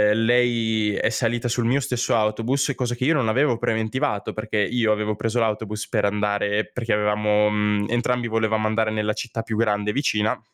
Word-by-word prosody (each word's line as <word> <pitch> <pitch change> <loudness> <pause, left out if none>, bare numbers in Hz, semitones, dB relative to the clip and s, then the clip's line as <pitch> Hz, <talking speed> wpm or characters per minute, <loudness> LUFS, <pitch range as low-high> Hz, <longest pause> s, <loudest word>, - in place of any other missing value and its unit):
uhm, - - 0
lei 115 -3 +2
è - - +1
salita 120 +1 -1
sul 120 0 -1
mio 130 +4 +2
stesso 125 -3 -1
autobus, 115 +6 0
cosa 120 -1 -2
che 125 - -2
io 160 - +4
non 135 -7 +1
avevo 125 +2 +2
preventivato, 110 0 -1
perché 110 0 -4
io 115 +2 +1
avevo 105 0 -1
preso 115 +3 -1
l'autobus 110 -1 -2
per 105 -3 +1
andare 105 0 0
perché 115 -3 -2
avevamo 105 0 +2
mhmm, 105 -1 0
entrambi 120 +1 0
volevamo 110 -1 0
andare 110 0 0
nella 105 0 -1
città 115 +1 -5
più 110 -1 -4
grande 105 -2 +1
vicina, 110 -6 0
110 Hz, 180 wpm, -23 LUFS, 105-120 Hz, -, io